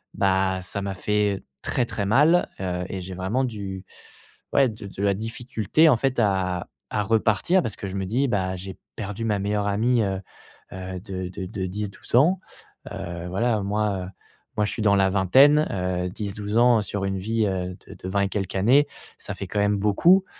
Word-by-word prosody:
bah, 95 -1 +1
ça 95 +2 -4
m'a 100 -1 -3
fait 105 0 0 0.2
très 125 - 0
très 100 -3 -3
mal, 150 - +4
heu 90 -1 -2
et 95 - -4
j'ai 95 +1 -7
vraiment 95 +9 0
du 100 -5 -6 0.7
ouais 135 -1 +5
de 105 -2 -8
de 100 0 -6
la 100 -1 +3
difficulté, 115 +6 +1
en 140 - +6
fait, 130 +1 0
à 95 -4 +1 0.2
à 105 - 0
repartir 110 - +2
parce 110 - -3
que - - -6
je 95 - -6
me 95 -1 -2
dis: 125 +8 +1
«Bah 95 -5 0
j'ai 95 +1 -7 0.2
perdu 105 +1 -5
ma 105 -2 +1
meilleure 105 +1 0
amie, 115 +4 +2
heu 95 -2 -1 0.5
heu, 95 0 -6
de 95 -1 -5
de 95 +1 -6
de 95 0 -4
10-12 100 +3 -4
ans». 165 +9 +5 0.5
Heu, 85 0 -5
voilà, 110 +3 +1
moi, 100 -2 -1
heu, - - -8 0.5
moi 105 - +3
je - - -2
suis - - -4
dans 100 -2 +5
la 95 -1 +4
vingtaine, 135 - +5
heu, 90 -1 -1
10-12 105 +2 -4
ans 120 -2 +5
sur 100 0 -3
une 95 0 -1
vie, 110 +3 0
heu, 90 -1 -3
de - - -9
de 95 - -7
20 100 +1 +1
et - - +1
quelques 95 -2 -3
années, 125 +10 +4 0.3
ça - - -6
fait - - -5
quand 105 - -2
même 105 0 +2
beaucoup. 165 - +4
100 Hz, 200 wpm, -24 LUFS, 95-115 Hz, 0.7 s, en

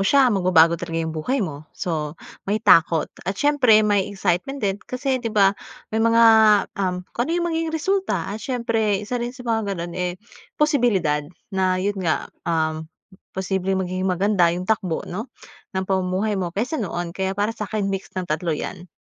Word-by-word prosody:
siya 270 -4 +5
magbabago 180 -4 +5
talaga 165 0 -2
'yong 160 - -4
buhay 210 - -1
mo. 155 -2 -8
So, 155 -3 -3 0.3
may 215 +2 -1
takot 165 -5 +4 0.2
at 195 - -2
siyempre 250 -6 +4
may 205 -2 +2
excitement 195 +6 -1
din 200 -6 -2
kasi 260 0 -1
di 235 - -2
ba, 200 -3 +4 0.4
may 220 - +1
mga 230 +1 +4 0.6
um, 180 -1 -1
kung 240 +4 -1
ano - - -1
'yong 345 - 0
magiging 325 -1 -1
resulta 350 - 0
at 215 - -6
siyempre 225 -5 0
isa 245 +3 -3
rin 240 +2 -4
sa 250 - -10
mga 225 -4 -1
gano'n 170 0 -5
eh, 180 0 -2 0.4
posibilidad 235 - +2 0.3
na 185 -1 +1
yo'n 195 +1 -1
nga 165 -4 0 0.2
uhm, 160 -1 -1 0.5
posibleng 190 0 -1
magiging 185 +1 -2
maganda 185 -1 +3
'yong 175 +2 -2
takbo, 185 -5 -1
'no, 215 +8 -6 0.5
ng 190 - 0
pamumuhay 190 +2 0
mo 180 - -1
kaysa 245 +8 -1
noon. 175 -4 -3
Kaya 190 +1 -2
para 205 +2 0
sa'kin, 215 -1 -3
mix 195 0 -4
ng 185 - -1
tatlo 160 -1 -1
'yan. 175 +4 -6
195 Hz, 175 wpm, -22 LUFS, 180-230 Hz, 0.6 s, siya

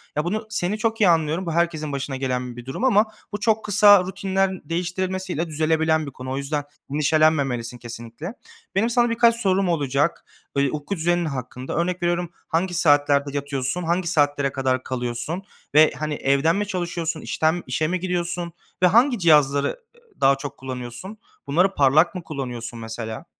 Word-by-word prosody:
Ya 150 - 0
bunu 215 +6 -2
seni 205 -1 -1
çok 225 0 -1
iyi 195 - +6
anlıyorum. 165 +2 +1
Bu 165 - -2
herkesin 160 -3 0
başına 140 0 -3
gelen 125 -2 -3
bir 120 - -9
durum 135 - -5
ama 220 -5 +5 0.3
bu 205 - -4
çok 220 +1 +1
kısa 205 -1 +6
rutinlen 190 0 -1
değiştirilmesiyle 180 0 -2
düzelebilen 160 0 +1
bir 140 - -7
konu. 130 0 -7
O 135 - -2
yüzden 145 +1 -2 0.3
endişelenmemelisin 140 -5 +1
kesinlikle. 120 - -8 0.4
Benim 220 +4 +2
sana 240 0 +3
birkaç 230 0 +4
sorum 195 -4 +1
olacak, 145 -1 0 0.3
böyle 140 -1 +2
uyku 150 +6 -4
düzenin 175 0 +1
hakkında 130 -3 -5
örnek 175 +2 -1
veriyorum. 175 0 0 0.2
Hangi 175 +3 0
saatlerde 145 -3 +3
yatıyorsun? 140 +3 -2
Hangi 170 +2 0
saatlere 145 -3 +1
kadar 130 -1 -1
kalıyorsun 125 +8 -3 0.3
ve 155 +1 +7
hani 155 0 -2
evden 140 +4 +2
mi 205 +1 -1
çalışıyorsun? 170 -3 -3
İşten 160 +2 0
işe 140 +5 0
mi 180 +3 -1
gidiyorsun? 175 -1 -2 0.3
Ve - - +8
hangi 240 +5 +4
cihazları, 145 -5 +4
ııı, 475 -2 -11
daha 135 0 +5
çok 140 0 -7
kullanıyorsun? 130 - -7 0.3
Bunları 180 +7 +2
parlak 155 +5 +4
mı 180 - -5
kullanıyorsun 125 -6 -5
mesela? 110 0 -6
160 Hz, 165 wpm, -23 LUFS, 140-185 Hz, 0.4 s, Ve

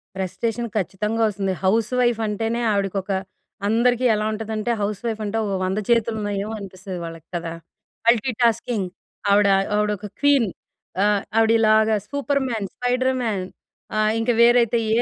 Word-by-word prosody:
Frustration 225 +5 -2
ఖచ్చితంగా 210 +4 -1
ఒస్తుంది. 195 -2 -2
హౌస్‌వైఫంటేనే, 225 +1 +1
ఆవిడకొక 195 -1 -1 0.6
అందరికీ 240 +3 +2
ఎలా 210 - -1
ఉంటదంటే, 220 +1 -3
హౌస్‌వైఫంటే 215 +1 -2
ఓ - - -2
100 190 +3 -1
చేతులున్నాయేమో 215 -2 0
అనిపిస్తది 185 -2 -7
వాళ్ళకి 165 -1 -9
కదా! 165 -1 -3 0.5
మల్టీటాస్కింగ్, 235 -3 +2 0.4
ఆవిడ 205 0 +5 0.3
ఆవిడొక 210 -1 -1
క్వీన్. 280 -7 +4 0.6
ఆహ్, 205 -1 +2
ఆవిడిలాగా 220 -1 +4
సూపర్‌మ్యాన్, 265 -6 -1
స్పైడర్‌మ్యాన్ 250 -5 0 0.5
ఆహ్, 215 0 +3
ఇంక 225 +2 -1
వేరైతే 235 0 +5 0.2
ఏ - - +4
220 Hz, 110 wpm, -22 LUFS, 200-235 Hz, 0.6 s, ఆవిడ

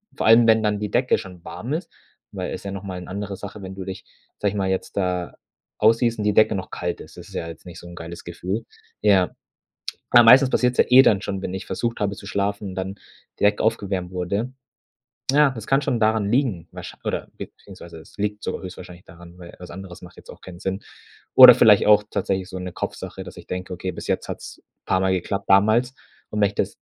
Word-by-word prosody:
Vor - - -1
allem, 115 +1 +7
wenn 110 -1 +5
dann 105 -1 0
die 105 -1 -4
Decke 125 +1 +2
schon 90 -2 -10
warm 115 +11 -6
ist, 165 - -3 0.4
weil - - -5
es - - -7
ja 100 - -5
nochmal 95 -2 -6
'ne 90 - -10
andere 100 +1 -5
Sache, 100 +1 -9
wenn 95 0 -7
du 95 -1 -7
dich, 95 -1 -7 0.3
sage 100 - 0
ich 105 - -7
mal, 95 -1 -1
jetzt 95 +1 -3
da 90 -2 -1 0.5
ausziehst 115 +1 +3
und 105 - -1
die 105 - +2
Decke 110 - +5
noch 95 -2 -4
kalt 90 0 -4
ist. - - -14
Das - - -11
ist - - -15
ja 85 - -4
jetzt 80 +1 -11
nicht 90 -2 -10
so 85 - -12
'n 85 - -11
geiles 85 0 -9
Gefühl. 95 +6 -4 0.4
Ja. 95 -3 +3 0.8
Aber 120 -1 +8
meistens 130 +3 +7
passiert 125 0 +2
es - - -12
ja - - +5
eh 125 +1 +9
dann 100 -7 +3
schon, 95 -2 -4
wenn 90 - -4
ich 95 - -6
versucht 115 0 -3
habe 100 -1 -1
zu 100 - -11
schlafen 100 0 -2
und 95 - -8
dann 95 +1 -4 0.5
die - - -4
Decke 105 0 +3
aufgewärmt 100 -5 -1
wurde. 100 +7 -3 0.8
Ja, 145 0 +5
das 110 -4 -8
kann 135 +1 +3
schon 120 -3 0
daran 110 -2 +2
liegen, 115 - 0
wahrschein - - -10
oder - - -2
beziehungsweise 85 -4 -11
es - - -17
liegt 105 +1 -3
sogar - - -4
höchstwahrscheinlich 90 -1 -10
daran, 85 +1 -15
weil 85 -1 -12
was 90 -1 -10
anderes 95 -1 -10
macht 90 0 -14
jetzt - - -16
auch - - -15
keinen 90 -2 -11
Sinn. 95 +1 -3 0.5
Oder - - +12
vielleicht - - +6
auch 105 0 +6
tatsächlich 95 -2 -2
so 95 - -7
'ne 90 -1 -6
Kopfsache, - - -6
dass - - -12
ich - - -11
denke: 90 +1 -5
„Okay, 90 +1 -4
bis - - -8
jetzt - - -1
hat's - - -8 0.2
paar 95 - +1
Mal 95 0 +1
geklappt 95 +2 -3
damals 110 +6 +4 0.4
und 105 - -3
wenn 100 - +5
ich 100 - -9
das - - -2
100 Hz, 235 wpm, -23 LUFS, 90-110 Hz, 0.8 s, Oder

